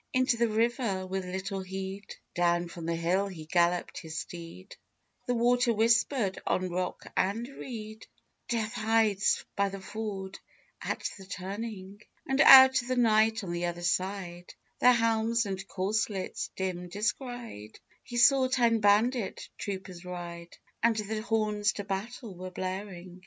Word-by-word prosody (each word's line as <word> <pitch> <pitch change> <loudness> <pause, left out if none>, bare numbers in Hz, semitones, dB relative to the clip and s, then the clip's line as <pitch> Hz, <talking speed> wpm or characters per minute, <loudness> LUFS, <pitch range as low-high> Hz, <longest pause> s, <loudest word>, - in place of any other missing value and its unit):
Into 255 -1 +3
the 235 0 +2
river 225 -3 0
with 190 0 -3
little 190 +2 -4
heed, 190 +1 -6 0.2
Down 175 0 +1
from 170 -1 -7
the 170 - 0
hill 180 +4 +1
he 170 -5 -8
galloped 175 +2 +1
his 160 -1 -7
steed 170 +3 -8 0.5
The 245 - +1
water 245 +1 +3
whispered 225 -1 +2
on 185 -1 0
rock 180 +1 -3
and 215 +5 0
reed, 220 -5 -8 0.4
"Death 225 -2 -1
hides 215 -2 +2
by 200 0 +1
the 195 0 -7
ford 195 -1 -6 0.4
at - - -2
the 190 - -12
turning!" 200 +1 -6 0.2
And 270 +1 +2
out 265 -1 +10
of 240 - -11
the 255 - 0
night 220 -2 +3
on 180 - -4
the 175 0 -2
other 175 0 -5
side, 180 0 -2 0.3
Their 250 - +7
helms 230 0 +2
and 195 -1 -5
corselets 195 0 -2
dim 180 -2 -3
descried, 210 - -4 0.2
He 240 - -7
saw 260 +2 +6
ten 235 -3 +2
bandit 210 +2 +2
troopers 190 -3 -6
ride, 175 -1 -8 0.2
And 230 -1 +3
the 215 0 -3
horns 215 -2 0
to 205 - -5
battle 205 +3 -5
were 185 +1 -7
blaring. 185 -1 -6
200 Hz, 145 wpm, -29 LUFS, 185-230 Hz, 0.5 s, out